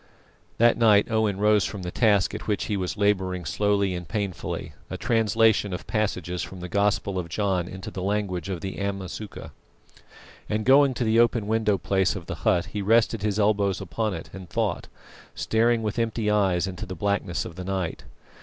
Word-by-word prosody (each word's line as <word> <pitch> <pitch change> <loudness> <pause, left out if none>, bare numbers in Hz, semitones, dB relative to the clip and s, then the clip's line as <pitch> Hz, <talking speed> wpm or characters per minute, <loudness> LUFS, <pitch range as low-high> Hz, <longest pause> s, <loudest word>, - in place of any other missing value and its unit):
That 120 +1 +4
night 105 -2 +5
Owen 110 -3 +1
rose 105 0 +4
from 100 -2 -5
the 90 - -4
task 105 -4 +3
at - - -6
which 105 -2 0
he 105 - -1
was 95 +1 -3
labouring 95 -4 0
slowly 100 +3 +1
and 90 -2 -5
painfully 100 -2 -4 0.2
a - - -4
translation 110 -3 +2
of 90 - -5
passages 90 -5 -2
from 95 - -7
the 90 - -6
Gospel 100 0 0
of 90 - -3
St. 85 - -15
John 95 -4 0
into 95 +1 -8
the 95 - -5
language 100 -3 -2
of 90 -4 -4
the 95 0 -5
Amasuka 100 +1 -5 1.0
and 105 0 -1
going 135 0 +5
to 125 - -1
the 115 0 +3
open 120 -2 +3
window 110 -1 +1
place 95 0 +1
of 90 -4 -7
the - - -5
hut, 90 +4 +2
he 105 - -2
rested 115 +1 +3
his 105 -1 -1
elbows 100 -2 +2
upon 105 +2 -2
it 80 - -8
and 95 -2 -9
thought, - - -1 0.5
staring 115 +1 +1
with 105 +2 -2
empty 115 -2 0
eyes 95 -4 +2
into 90 -3 -6
the 95 - -6
blackness 100 0 -1
of 85 - -8
the 90 - -6
night. 95 -3 -3
100 Hz, 190 wpm, -25 LUFS, 95-110 Hz, 1.0 s, night